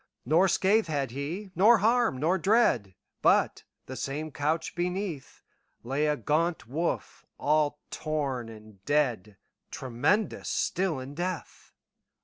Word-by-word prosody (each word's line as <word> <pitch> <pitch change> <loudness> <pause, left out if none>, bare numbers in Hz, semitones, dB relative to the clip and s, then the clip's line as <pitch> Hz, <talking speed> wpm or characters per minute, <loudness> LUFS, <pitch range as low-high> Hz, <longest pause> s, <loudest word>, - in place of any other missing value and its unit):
Nor 165 +9 +4
scath 200 +3 +3
had 140 -5 -2
he, 165 - -5
nor 215 +7 +6
harm, 225 - +2
nor 170 +7 +1
dread, 165 - +2 0.3
But, - - +3 0.2
the 130 - -7
same 150 +4 -4
couch 155 +3 -1
beneath, 180 -4 -4 0.4
Lay 135 +5 0
a 150 0 +1
gaunt 165 +4 0
wolf, 160 +7 -3
all 150 0 +1
torn 140 -7 -2
and 110 -3 -14
dead, 120 -9 0 0.3
Tremendous 135 - -1
still 185 -4 0
in 130 +2 -7
death. 175 +1 -5
155 Hz, 125 wpm, -28 LUFS, 130-185 Hz, 0.4 s, nor